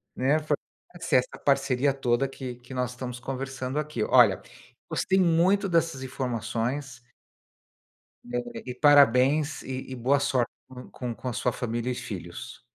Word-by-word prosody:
né, 140 +5 +2
fortalece 155 +2 -4
essa 125 - +1
parceria 135 -1 +2
toda 130 0 +1
que 130 -2 -7
que 125 +2 -13
nós 125 -1 -1
estamos 125 0 -6
conversando 130 +1 -4
aqui". 150 -8 -2
Olha, - - +5 0.5
gostei 190 0 +1
muito 185 +3 +3
dessas 165 -6 +1
informações 125 +1 -3 1.2
adorei 245 -1 -5
e 125 - -4
parabéns 145 +1 +4
e 130 0 -6
e - - -3
boa 130 +3 +2
sorte 130 -4 +1 0.2
com 125 -1 -11
com 125 -2 -5
com 130 - -6
a - - -2
sua 125 - 0
família 120 +1 -3
e - - -1
filhos. 90 -7 -7
130 Hz, 145 wpm, -27 LUFS, 125-145 Hz, 1.2 s, Olha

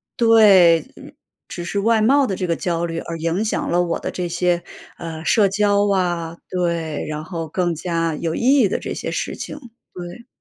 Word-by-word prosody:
对。 195 -8 +5 0.7
只 175 - -5
是 200 - -2
外 225 +1 +3
貌 275 +5 +4
的 200 - -2
这 185 - -2
个 170 - 0
焦 170 0 -2
虑 165 0 -4
而 165 - -6
影 165 +5 -1
响 220 - -2
了 175 +1 +2
我 170 -1 -2
的 - - -4
这 180 - -4
些， 175 0 0 0.3
呃， 165 -1 -7
社 205 0 +4
交 205 0 +2
啊。 175 -3 -1
对， 170 -4 -2
然 155 0 -5
后 165 -2 -5
更 175 0 -1
加 165 -1 -2
有 160 +1 -3
意 - - -3 0.2
义 205 -6 +4
的 - - -1
这 - - -5
些 - - -5
事 - - -3
情， 295 - -7 0.4
对。 180 +6 -9
175 Hz, 210 characters per minute, -20 LUFS, 165-200 Hz, 0.7 s, 对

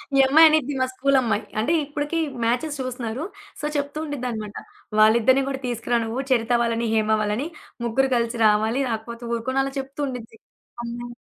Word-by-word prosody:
ఈ 275 - +5
అమ్మాయి 320 +4 +8
అనిద్ది 295 -2 +1
మా - - +4
స్కూలు 275 +1 +2
అమ్మాయి. 220 -4 0 0.2
అంటే 270 +10 +1
ఇప్పటికి 295 +2 -3 0.3
మ్యాచెస్ 280 +5 -1
చూస్తున్నారు. 250 +1 -4 0.4
సో, - - -3
చెప్తూ 285 +1 -3
ఉండిద్దనమాట. 240 -8 -4 0.4
"వాళ్ళిద్దరిని 235 +5 +5
కూడా 270 0 -4
తీసుకురా! 240 0 0
నువ్వు 230 +4 -3
చరిత 235 -1 +2
వాళ్ళని, 230 0 0
హేమ 220 -1 +1
వాళ్ళని 215 +8 -1 0.4
ముగ్గురు 265 +4 +1
కలిసి 235 0 -1
రావాలి. 220 +5 +2
రాకపోతే 230 +1 -5
ఊరుకొను" 260 +4 0
అలా 275 0 -4
చెప్తూ 270 +2 -8
ఉండిద్ది. 230 -3 -7 0.5
అమ్మొ 240 0 -6
245 Hz, 160 wpm, -23 LUFS, 230-275 Hz, 0.5 s, అమ్మాయి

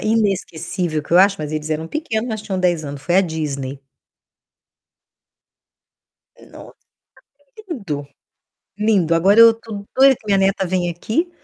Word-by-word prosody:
inesquecível 180 -6 -1
que 155 - -9
eu 175 - +6
acho, 195 +1 +5
mas 150 -1 -5
eles 155 0 -4
eram 160 +1 -3
pequenos, 245 - -3
mas 215 -2 -4
tinham 195 -3 -4
10 175 -4 0
anos, 140 -1 -7
foi 175 +4 +1
a 195 - +7
Disney. 145 -6 -4 2.7
Nossa, - - -13 0.9
lindo, 170 - -5 0.7
lindo. 200 -6 +2
Agora 195 +6 +4
eu 230 0 +9
tô 220 -3 -9
doida 265 0 +6
que 225 - -23
minha 200 -2 +2
neta 195 0 +1
vem 180 -1 -1
aqui, 220 - -2
185 Hz, 140 wpm, -19 LUFS, 160-215 Hz, 2.7 s, eu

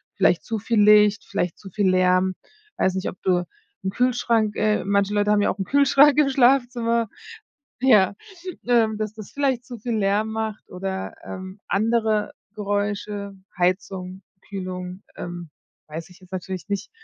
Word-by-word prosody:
Vielleicht - - +3
zu 225 -2 -2
viel 225 +1 0
Licht, 210 +1 +5
vielleicht 175 -2 -2
zu 195 - -10
viel 200 0 +1
Lärm, 185 0 +3 0.4
weiß 190 0 +1
nicht, 190 - -2
ob - - -12
du 180 -1 +2 0.4
'n - - +1
Kühlschrank 230 -2 +1
äh, 215 0 +1
manche 200 0 +1
Leute 205 0 +1
haben 210 - +4
ja - - +2
auch - - -8
'n 195 - -1
Kühlschrank 280 +2 +5
im 290 -2 +4
Schlafzimmer, 245 -3 +2 0.7
ja, 210 -7 +5 0.5
ähm, 225 -3 +3
dass 215 -1 -3
das 215 -2 -10
vielleicht 270 -4 0
zu 245 -2 -8
viel 235 +2 -3
Lärm 205 +2 +1
macht 220 -1 -4
oder, 190 +1 -4
ähm, 190 +1 -8
andere 220 0 +1 0.2
Geräusche, 205 0 -3 0.2
Heizung, 185 +1 -1 0.3
Kühlung, 185 -1 -6
ähm, 175 -2 -7 0.4
weiß 160 +3 -7
ich 180 - -17
jetzt 185 0 -19
natürlich 185 0 -5
nicht. 200 0 -3
205 Hz, 160 wpm, -23 LUFS, 190-225 Hz, 0.7 s, Licht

